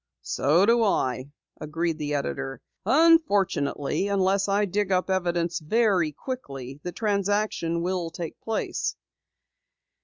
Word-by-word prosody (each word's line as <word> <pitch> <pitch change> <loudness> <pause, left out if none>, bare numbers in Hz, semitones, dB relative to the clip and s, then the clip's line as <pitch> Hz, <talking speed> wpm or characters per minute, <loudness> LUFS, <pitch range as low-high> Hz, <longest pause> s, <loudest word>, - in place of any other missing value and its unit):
"So 160 +8 +3
do 235 +2 +4
I," 130 - 0 0.3
agreed 165 +2 -2
the 150 -1 -2
editor. 135 -2 -3 0.3
"Unfortunately, 205 - +3
unless 195 0 +2
I 205 +1 +2
dig 200 +1 -1
up 185 +1 +1
evidence 175 -2 0
very 185 -1 +2
quickly, 140 - -7
the 180 - -5
transaction 200 -4 0
will 180 -2 -1
take 170 -1 -7
place." 225 -1 -2
185 Hz, 115 wpm, -26 LUFS, 155-205 Hz, 0.3 s, do